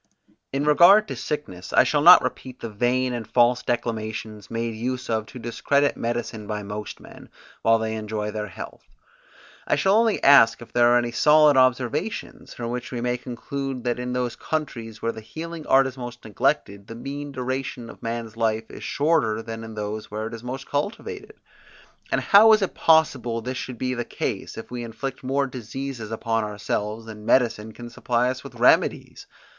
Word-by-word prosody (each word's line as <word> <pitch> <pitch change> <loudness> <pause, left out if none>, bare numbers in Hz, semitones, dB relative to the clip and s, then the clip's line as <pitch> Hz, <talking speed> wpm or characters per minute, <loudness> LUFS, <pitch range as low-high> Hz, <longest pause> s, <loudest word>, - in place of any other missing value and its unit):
In 140 +2 -1
regard 180 +8 +7
to - - -4
sickness, 95 -12 -5
I - - +7
shall 145 - +1
not 175 +4 +9
repeat 130 -1 -5
the 115 - -6
vain 125 +4 0
and 115 -3 -5
false 120 0 +3
declamations 110 -3 -4
made 115 0 -2
use 125 +2 -3
of 110 -1 -1
to - - -11
discredit 140 +4 0
medicine 115 -2 -4
by 105 -1 -4
most 105 +1 -6
men, - - -14 0.3
while 115 0 +4
they 110 0 -2
enjoy 105 -1 -3
their 105 0 -4
health; 90 - -9 0.9
I - - +3
shall 190 +7 +2
only 225 -1 +3
ask 140 -5 +7
if 120 - -13
there 120 0 +5
are 120 0 +5
any 120 -1 0
solid 150 +3 +5
observations 130 -2 0
from 120 -1 -4
which 125 0 -5
we 125 - -3
may 125 +1 0
conclude 130 +1 -5
that 120 -1 -1
in 125 0 -3
those 125 -1 -2
countries 115 -8 -5
where 115 - +1
the 110 - -9
healing 160 +7 -8
art 135 0 +5
is 130 0 -6
most 120 -1 -8
neglected, 100 -1 -1
the 115 - -8
mean 140 +4 -6
duration 130 -2 -4
of - - -12
man's 115 -1 -4
life 110 -1 -1
is - - -10
shorter 140 -8 +1
than 115 0 -7
in 110 -1 -9
those 105 0 -5
where 110 +1 -4
it 115 - -6
is 115 0 -8
most 130 +2 -5
cultivated? 405 - -4 0.8
And - - +1
how 220 +2 +7
is 215 -2 +3
it 190 - -2
possible 135 -8 +3
this 125 +3 -5
should 125 -2 -6
be 130 +2 -1
the 120 -1 -2
case, - - -4
if - - -8
we 120 -1 -4
inflict 120 +4 -6
more 135 +2 +1
diseases 125 -1 -6
upon 115 0 -1
ourselves 105 +1 -3
than 110 -1 -10
medicine 110 -2 +2
can 120 +2 -10
supply 125 +1 0
us 130 - -7
with - - -11
remedies! - - +2
120 Hz, 190 wpm, -24 LUFS, 110-135 Hz, 0.9 s, not